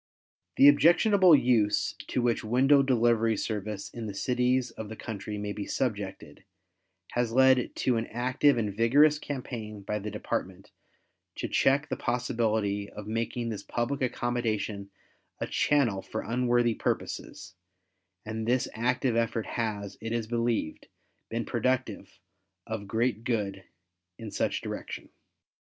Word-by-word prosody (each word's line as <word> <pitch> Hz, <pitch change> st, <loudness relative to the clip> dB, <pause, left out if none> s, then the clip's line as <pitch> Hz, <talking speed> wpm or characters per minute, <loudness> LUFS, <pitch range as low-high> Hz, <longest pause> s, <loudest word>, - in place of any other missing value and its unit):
The 140 Hz, -, +7 dB
objectionable 175 Hz, +4 st, +6 dB
use 115 Hz, -6 st, +2 dB
to 125 Hz, -, -1 dB
which 120 Hz, -1 st, +1 dB
window 135 Hz, +5 st, +4 dB
delivery 115 Hz, -4 st, +2 dB
service 105 Hz, -2 st, -4 dB
in 115 Hz, -2 st, -6 dB
the 100 Hz, -, -6 dB
cities 125 Hz, +2 st, +1 dB
of 110 Hz, -2 st, -8 dB
the 110 Hz, -, -6 dB
country 105 Hz, -2 st, -6 dB
may 105 Hz, 0 st, -3 dB
be 100 Hz, -1 st, -5 dB
subjected, 100 Hz, -, -3 dB, 0.7 s
has 120 Hz, -1 st, 0 dB
led 130 Hz, 0 st, +4 dB
to 125 Hz, -2 st, +1 dB
an 115 Hz, -, -2 dB
active 130 Hz, +3 st, +2 dB
and 105 Hz, -3 st, -1 dB
vigorous 145 Hz, +7 st, +4 dB
campaign 115 Hz, -8 st, -6 dB
by 105 Hz, +1 st, -2 dB
the 105 Hz, +1 st, -5 dB
Department 95 Hz, -2 st, -4 dB, 0.6 s
to -, -, -3 dB
check 140 Hz, +3 st, +2 dB
the -, -, -3 dB
possibility 110 Hz, -4 st, -1 dB
of 105 Hz, -, -9 dB
making 115 Hz, +2 st, -2 dB
this 105 Hz, -3 st, -4 dB
public 130 Hz, +4 st, -2 dB
accommodation 115 Hz, -5 st, -2 dB, 0.5 s
a -, -, -1 dB
channel 120 Hz, -10 st, +1 dB
for 110 Hz, -, -5 dB
unworthy 120 Hz, -1 st, +2 dB
purposes, 95 Hz, -, -4 dB, 0.7 s
and 110 Hz, +1 st, -4 dB
this 125 Hz, +2 st, +2 dB
active 125 Hz, +2 st, 0 dB
effort 115 Hz, -1 st, 0 dB
has, 105 Hz, -4 st, -4 dB
it 115 Hz, 0 st, -4 dB
is 115 Hz, -1 st, -1 dB
believed, 115 Hz, -7 st, -2 dB, 0.4 s
been 115 Hz, 0 st, -2 dB
productive 120 Hz, -6 st, -2 dB, 0.5 s
of 110 Hz, -2 st, -5 dB
great 115 Hz, +1 st, 0 dB
good 100 Hz, -6 st, -2 dB, 0.5 s
in 110 Hz, -2 st, -8 dB
such -, -, -1 dB
direction. -, -, -6 dB
115 Hz, 135 wpm, -28 LUFS, 105-125 Hz, 0.7 s, The